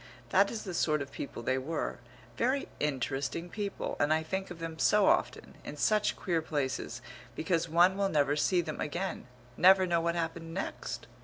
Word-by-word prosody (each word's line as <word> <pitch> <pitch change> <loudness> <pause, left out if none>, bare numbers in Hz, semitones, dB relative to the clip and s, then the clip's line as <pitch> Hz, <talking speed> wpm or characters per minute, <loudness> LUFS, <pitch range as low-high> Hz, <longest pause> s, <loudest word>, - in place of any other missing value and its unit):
That 195 +8 +4
is 225 - -5
the 185 - -5
sort 150 -3 +1
of 140 - -12
people 135 -3 -6
they 130 +2 +1
were 145 -2 -3 0.4
very 260 - 0
interesting 145 +4 -2
people, 205 -2 -4
and 145 +1 +2
I 160 0 +2
think 190 +4 -3
of 175 - -8
them 165 -1 -6
so 210 0 +4
often, 345 +3 +1
in - - -7
such 215 -2 +2
queer 170 -4 -1
places, 130 -5 -3 0.3
because 165 +1 0
one 175 +3 +5
will 200 -1 +1
never 145 -3 +2
see 175 +4 +2
them 155 -3 -5
again, 170 0 -3 0.3
never 190 +1 +7
know 170 -2 +1
what 170 +1 0
happened 165 0 -3
next. 195 - -4
165 Hz, 180 wpm, -31 LUFS, 150-190 Hz, 0.4 s, never